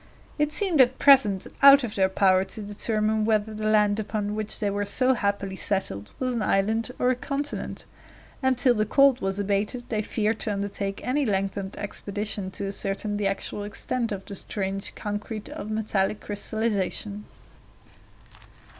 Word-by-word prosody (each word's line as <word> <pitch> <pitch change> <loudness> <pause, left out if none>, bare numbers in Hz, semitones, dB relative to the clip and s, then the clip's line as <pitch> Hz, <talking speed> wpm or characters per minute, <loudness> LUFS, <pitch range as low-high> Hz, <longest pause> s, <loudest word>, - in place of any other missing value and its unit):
It 295 0 +1
seemed 345 -4 +4
at 255 0 +3
present 225 -9 +5 0.2
out 275 0 +9
of 225 -3 -4
their 190 -1 +2
power 190 -1 +3
to 215 - -5
determine 215 +1 0
whether 215 0 +1
the 215 0 -3
land 210 -1 +3
upon 210 -1 -3
which 215 0 -2
they 205 -3 -1
were 205 +1 -1
so 255 +6 +3
happily 200 -4 -2
settled 190 - -1
was 255 -1 -1
an 235 - -2
island 215 +4 +1
or 250 - +2
a - - +1
continent, 280 +3 -4 0.6
and 260 -1 +2
till 250 0 +4
the 215 -2 0
cold 275 +1 +4
was 195 0 -2
abated 205 +4 -1
they 215 -2 0
feared 215 +1 -1
to 210 - -2
undertake 200 0 -4
any 280 +4 +1
lengthened 195 -3 -2
expedition 205 -1 -3
to 190 +1 -5
ascertain 200 +1 -2
the 205 -1 0
actual 195 +1 -2
extent 230 +3 -2
of 195 -1 -5
the 200 - -8
strange 195 0 -3
concrete 210 +1 -5
of 210 - -7
metallic 215 -2 0
crystallization. 210 -1 -2
210 Hz, 165 wpm, -25 LUFS, 200-230 Hz, 0.6 s, out